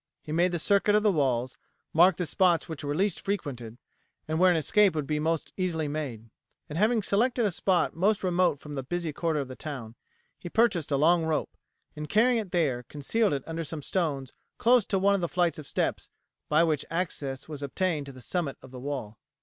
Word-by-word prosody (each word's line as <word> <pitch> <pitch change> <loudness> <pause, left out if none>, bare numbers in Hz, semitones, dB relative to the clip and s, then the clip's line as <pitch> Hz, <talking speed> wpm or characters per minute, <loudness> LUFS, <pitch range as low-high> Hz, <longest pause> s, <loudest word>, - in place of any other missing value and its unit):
He 150 - -8
made 175 +3 +2
the 175 - -1
circuit 200 +4 +3
of 210 - +3
the 210 - +4
walls, 130 -6 0 0.4
marked 175 +2 +5
the 180 - -1
spots 175 0 +2
which 160 -3 -7
were 145 0 -2
least 195 +2 0
frequented 130 - -4 0.5
and 155 +1 -1
where 185 +1 +6
an 175 - +3
escape 195 +3 +3
would 150 -2 -1
be 150 +1 -1
most 160 +1 -1
easily 170 -5 -1
made; 130 -7 -5 0.4
and, 150 - -7
having 220 +1 +3
selected 235 +4 +2
a 205 - +1
spot 180 +1 +1
most 200 +5 +1
remote 180 -5 +2
from 150 +1 -9
the 135 - -3
busy 165 +3 -3
quarter 160 0 -1
of 140 - -3
the 130 - -8
town, 130 -8 -7 0.5
he 175 - -7
purchased 190 -8 +2
a 140 - +1
long 165 +4 +4
rope, 160 -2 -2 0.4
and 150 -1 -6
carrying 235 +3 +4
it 210 -4 -5
there 145 -8 +1
concealed 170 - 0
it 140 -2 -2
under 165 0 -4
some 155 -1 -6
stones 145 -8 -2 0.2
close 240 -2 +4
to 195 - 0
one 200 +1 +3
of 200 - 0
the 170 - -1
flights 175 -2 +1
of 150 - -10
steps - - -2 0.4
by 155 +2 +4
which 155 -4 +1
access 150 -6 -3
was 150 -2 -7
obtained 150 +1 -1
to - - -7
the 130 -1 -13
summit 155 0 -2
of 130 - -13
the 130 - -8
wall. 130 -6 -5
160 Hz, 215 wpm, -28 LUFS, 145-185 Hz, 0.5 s, where